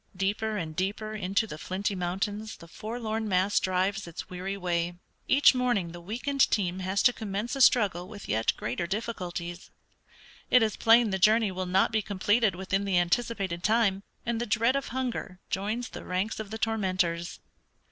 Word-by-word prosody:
"Deeper 210 +3 -1
and 160 -4 -4
deeper 205 +4 -2
into 200 +1 0
the 155 -8 -8
flinty 195 +5 -2
mountains 195 +4 -3
the 170 - -13
forlorn 220 +2 -4
mass 190 +2 +3
drives 190 +1 0
its 170 - -8
weary 190 +2 -4
way. 175 -2 -1 0.3
Each 280 +1 +6
morning 245 -9 0
the 175 0 -9
weakened 250 +9 +1
team 185 -3 0
has 190 +1 0
to 245 - +5
commence 215 +3 -3
a 275 - -2
struggle 195 -8 +4
with 205 0 -10
yet 110 +1 +2
greater 125 +9 -3
difficulties. 180 -4 -4 0.8
It 250 -2 +6
is 215 -2 0
plain 230 -1 +5
the 190 - -1
journey 215 +1 +4
will 185 0 -4
not 190 +4 +3
be 220 -1 +1
completed 205 +1 +1
within 195 +2 -1
the 195 -2 +1
anticipated 185 -1 0
time, 215 -3 +2 0.2
and 235 -1 -1
the 240 - -2
dread 230 +5 +2
of 275 - -1
hunger 240 -7 -4
joins 215 +6 -2
the - - -8
ranks 185 +5 -2
of 215 -2 -5
the 220 - -5
tormentors.... 185 -6 -1
200 Hz, 175 wpm, -28 LUFS, 185-225 Hz, 0.8 s, Each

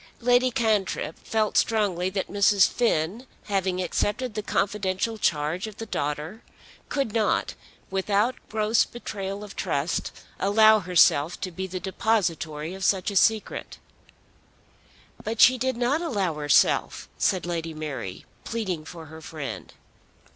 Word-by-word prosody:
Lady 245 +1 +3
Cantrip 220 -5 0
felt 215 -2 0
strongly 195 -5 +1
that 190 0 -3
Mrs. 200 -1 +4
Finn 225 +1 0 0.2
having 190 -3 -1
accepted 210 +7 -1
the 215 - -3
confidential 205 +1 -1
charge 160 +4 0
of 215 -1 -10
the 225 - -5
daughter 150 +6 -3 0.5
could 275 -7 -1
not, 220 -2 +1 0.4
without 200 +5 +1 0.2
gross 215 +1 +2
betrayal 200 -4 -6
of 205 - -10
trust, 145 +4 -1 0.3
allow 215 +2 +5
herself 175 -3 +3
to 185 - -3
be 190 +2 -5
the 185 0 -5
depositary 170 -5 -1
of 190 0 -7
such 190 +1 +2
a - - -7
secret. 220 +2 +1 1.5
"But 225 +1 -4
she 255 0 +7
did 260 0 -1
not 250 +6 +1
allow 205 - -1
herself," 145 -3 +2
said 185 -3 +1
Lady 165 -2 -3
Mary, 140 -12 -6 0.2
pleading 190 -9 -3
for 165 -1 -9
her 160 +1 -11
friend. 155 -3 -7
195 Hz, 135 wpm, -25 LUFS, 170-220 Hz, 1.5 s, she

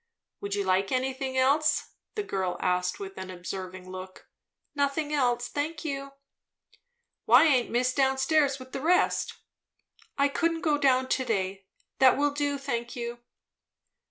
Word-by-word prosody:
"Would 200 0 -3
you 200 - 0
like 190 +1 +1
anything 260 0 -1
else?" 290 +4 +2 0.2
the 420 - -1
girl 190 - -2
asked 180 0 0
with 195 -1 -7
an 190 0 -6
observing 185 0 -7
look. 185 0 -9 0.5
"Nothing 290 +1 -1
else, 245 -4 +1
thank 305 +3 -4
you." 275 -2 -4 1.1
"Why 245 +6 +7
aint 260 -6 +3
miss 250 +2 +1
down 265 -1 +2
stairs 280 0 +2
with 260 -1 -12
the 270 - -4
rest?" 350 +4 +2 0.8
"I 280 0 +4
couldn't 330 +3 0
go 295 -2 +1
down 260 -2 +3
to 260 - +1
day. 195 -4 -2 0.3
That 260 -2 +6
will 290 +1 +2
do, 285 0 -1
thank 240 -3 -4
you." 240 0 -5
260 Hz, 150 wpm, -28 LUFS, 195-285 Hz, 1.1 s, Why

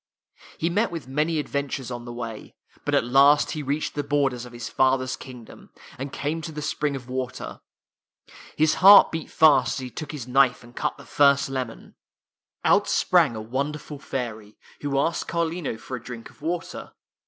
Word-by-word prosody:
He 165 +2 -1
met 210 +6 +1
with 165 -6 -7
many 150 +4 0
adventures 140 -3 -3
on 120 -1 -6
the 120 - -7
way, 115 -2 -7 0.3
but - - +1
at - - +3
last 140 +4 +5
he 155 - -4
reached 145 +2 -2
the 145 - -2
borders 140 -4 0
of 125 - -11
his 120 -1 -7
father's 130 -1 +1
kingdom, 125 -3 -12 0.3
and 135 +1 -5
came 150 +4 -3
to 160 - -6
the 150 -1 -6
spring 145 -1 -1
of 130 -2 -8
water. 130 0 -5 1.0
His 155 0 +3
heaii 200 +2 +9
beat 160 -1 -5
fast 155 -2 +4
as - - -4
he 125 - -7
took 155 +2 -6
his 140 -6 -7
knife 130 -1 +3
and 120 0 -16
cut - - -2
the - - -13
first 140 -1 +3
lemon. 130 -4 -5 0.7
Out - - +4
sprang 115 - +3
a 110 - -5
wonderful 140 +5 -4
fairy, 110 -6 -6 0.2
who 140 -1 -1
asked 165 +5 0
Carlino 170 -6 -2
for 130 - -7
a 115 - -13
drink 120 -2 -9
of - - -25
water. 170 +2 -4
140 Hz, 185 wpm, -25 LUFS, 125-150 Hz, 1.0 s, heaii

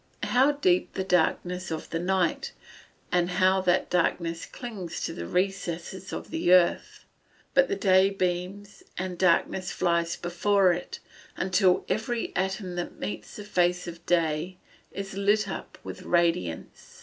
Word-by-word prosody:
How 265 +4 +3
deep 185 -11 +1
the 190 - -2
darkness 180 0 0
of 160 -1 -5
the 165 - -1
night, 180 -1 0 0.6
and 175 0 +2
how 190 +1 +3
that 180 0 +1
darkness 170 -2 0
clings 205 -9 -7
to - - -3
the 85 - -6
recesses 185 -1 -2
of - - -6
the 325 - +1
earth. 180 -1 +3 0.5
But 275 -1 +5
the - - -1
day 190 -1 +4
beams, 190 +2 -3 0.2
and 185 0 -3
darkness 185 +1 +1
flies 170 -2 0
before 185 +2 +2
it, 175 - -6 0.4
until 185 0 +2
every 225 +4 -2
atom 190 -1 -2
that 175 - -4
meets 105 0 -6
the 210 - -7
face 180 -3 +1
of 170 0 -8
day 170 +1 0 0.3
is 195 -1 -6
lit 200 +2 +2
up 190 - -7
with - - -8
radiance. 165 - -1
185 Hz, 145 wpm, -27 LUFS, 175-195 Hz, 0.6 s, But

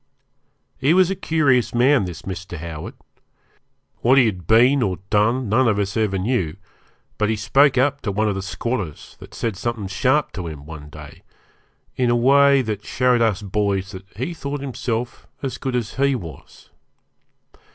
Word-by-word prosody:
He 140 +6 +3
was 185 0 +4
a - - -1
curious 140 -10 +1
man, 130 -2 +4
this 90 -3 -8
Mr. 95 -2 -6
Howard. 80 -1 -7 1.0
What 130 +3 +4
he 130 - +6
had 90 -6 -3
been 125 +5 +5
or 95 -5 0
done 115 +4 +2
none 120 +5 +3
of 105 -3 +2
us 100 0 -2
ever 105 -3 0
knew, 95 -5 -1 0.6
but 105 0 +1
he 110 - +1
spoke 135 +6 +3
up 140 +2 +2
to 100 - -2
one 110 +2 0
of 105 - +1
the 95 - -4
squatters 90 - -4
that - - -13
said 115 -4 -2
something 115 0 -3
sharp 130 +10 +1
to 90 -3 -6
him 75 -3 -8
one 75 -1 -10
day - - -12 0.8
in 125 -1 +2
a 120 - +3
way 140 +2 +5
that 105 -3 -4
showed 125 -2 +1
us 110 -3 +1
boys 100 -1 -1
that 95 -1 -10
he 130 +9 -3
thought 145 -3 -5
himself 125 -3 -4 0.2
as 135 - -4
good 130 -2 -3
as 115 -4 -2
he 140 0 +2
was. 85 -10 -10
115 Hz, 175 wpm, -21 LUFS, 95-130 Hz, 1.0 s, he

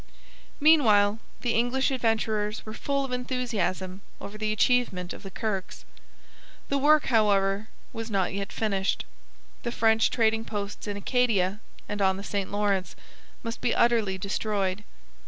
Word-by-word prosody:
Meanwhile 225 -9 +5 0.2
the 240 -2 0
English 245 +4 +1
Adventurers 220 -3 0
were 215 - -7
full 275 +3 -1
of 265 - -7
enthusiasm 230 -7 -2 0.2
over 200 - -8
the 215 0 -1
achievement 215 -6 +1
of - - -10
the 195 - -8
Kirkes. 195 -1 -4 0.8
The 280 - +1
work, 300 +2 +5
however, 205 -3 +2 0.3
was 225 0 -5
not 195 -4 0
yet 200 0 -4
finished. 200 -3 -1 0.6
The 235 - -3
French 225 -1 +3
trading 225 -1 +2
posts 205 -1 -5
in 205 -1 -3
Acadia 205 -4 +1 0.3
and 205 0 -3
on 190 -1 +3
the 200 - -7
St 200 -2 -3
Lawrence 200 -2 0 0.5
must 230 0 -5
be 245 - +1
utterly 225 -5 +2
destroyed. 200 0 -2
215 Hz, 140 wpm, -27 LUFS, 200-235 Hz, 0.8 s, Meanwhile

